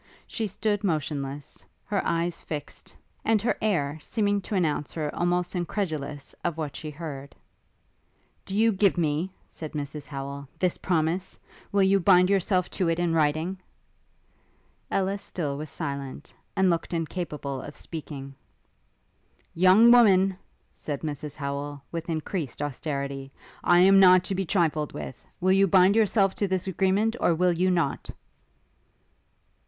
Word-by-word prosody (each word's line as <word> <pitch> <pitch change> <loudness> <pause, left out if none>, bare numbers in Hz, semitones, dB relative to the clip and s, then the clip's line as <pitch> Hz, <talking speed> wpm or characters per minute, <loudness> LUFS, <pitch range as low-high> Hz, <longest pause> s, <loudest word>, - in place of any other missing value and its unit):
She 220 - -3
stood 205 +1 -1
motionless, 145 -5 -3 0.2
her 205 -2 0
eyes 170 0 -1
fixed, 150 -2 -7 0.3
and 220 -1 +3
her 235 - +1
air 160 -8 0
seeming 205 0 0
to 205 - -4
announce 150 -7 0
her 150 -2 -3
almost 175 +1 0
incredulous 165 -6 -3
of 170 -2 -1
what 150 -3 -4
she 155 - -6
heard. 145 -3 -8 1.1
'Do 195 +1 -4
you 225 +1 +5
give 195 -2 +2
me,' 160 +2 0 0.2
said 155 -2 -8
Mrs 145 0 -5
Howel, 140 0 -6
'this 180 -2 0
promise? 175 +1 -1 0.3
Will 200 -1 +3
you 195 +1 +4
bind 180 0 +5
yourself 185 -2 +2
to 185 -4 0
it 165 - +1
in 175 -1 0
writing?' 160 +4 +1 1.3
Ellis 195 +1 0
still 150 -6 -3
was 150 +1 -6
silent, 140 -2 -6 0.2
and 190 -2 +4
looked 170 +1 -2
incapable 150 -5 -4
of 145 - -9
speaking. 140 -4 -7 1.2
'Young 190 +7 +6
woman,' 195 -6 +6 0.4
said 145 -2 -5
Mrs 150 -1 -5
Howel, 140 0 -4
with 165 0 -5
increased 160 -2 -3
austerity, 140 -1 -4 0.3
'I 175 0 +5
am 195 +1 +7
not 185 -1 +7
to 195 - -2
be 190 0 -1
trifled 160 -5 0
with. 130 - -7 0.2
Will 185 +1 +2
you 195 +1 +5
bind 190 +2 +5
yourself 205 -3 +3
to 200 - +3
this 185 -1 -1
agreement, 195 +4 +1
or 170 - +3
will 180 +1 +3
you 180 +2 +1
not?' 170 -6 0
170 Hz, 145 wpm, -26 LUFS, 150-190 Hz, 1.3 s, am